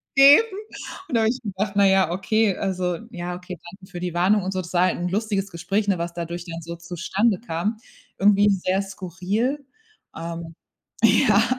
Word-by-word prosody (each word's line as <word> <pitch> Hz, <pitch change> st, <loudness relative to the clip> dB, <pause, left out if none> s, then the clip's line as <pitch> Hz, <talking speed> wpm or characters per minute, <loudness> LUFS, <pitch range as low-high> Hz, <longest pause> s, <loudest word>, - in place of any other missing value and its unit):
geben." 280 Hz, +11 st, +8 dB, 0.6 s
Und -, -, -1 dB
da 225 Hz, -, +4 dB
hab 220 Hz, -, +3 dB
ich 250 Hz, +2 st, -3 dB
gedacht: 200 Hz, -1 st, -3 dB
„Na 200 Hz, -1 st, +5 dB
ja 190 Hz, -3 st, +3 dB
okay, 200 Hz, +2 st, +1 dB
also 185 Hz, -3 st, -1 dB
ja 175 Hz, 0 st, -5 dB
okay, 180 Hz, 0 st, -8 dB
danke 190 Hz, 0 st, -15 dB
für 175 Hz, -, -6 dB
die 180 Hz, -2 st, -3 dB
Warnung 190 Hz, +4 st, +3 dB
und 190 Hz, -, -2 dB
so.“ 185 Hz, -, -1 dB
Das 175 Hz, 0 st, -10 dB
war 175 Hz, 0 st, +4 dB
halt 185 Hz, -, +1 dB
'n 175 Hz, +1 st, -2 dB
lustiges 200 Hz, 0 st, -1 dB
Gespräch, 200 Hz, +5 st, -1 dB
ne, 195 Hz, -2 st, +2 dB
was 170 Hz, 0 st, -3 dB
dadurch 170 Hz, 0 st, -5 dB
dann 165 Hz, -1 st, -6 dB
so 170 Hz, +1 st, -7 dB
zustande 185 Hz, +5 st, -1 dB
kam. 210 Hz, +1 st, -2 dB, 0.4 s
Irgendwie 205 Hz, +1 st, +5 dB
sehr 190 Hz, 0 st, +1 dB
skurril 195 Hz, -, -3 dB, 0.5 s
ähm 165 Hz, 0 st, -6 dB, 0.5 s
ja. 215 Hz, -1 st, +5 dB
190 Hz, 185 wpm, -23 LUFS, 175-205 Hz, 0.6 s, geben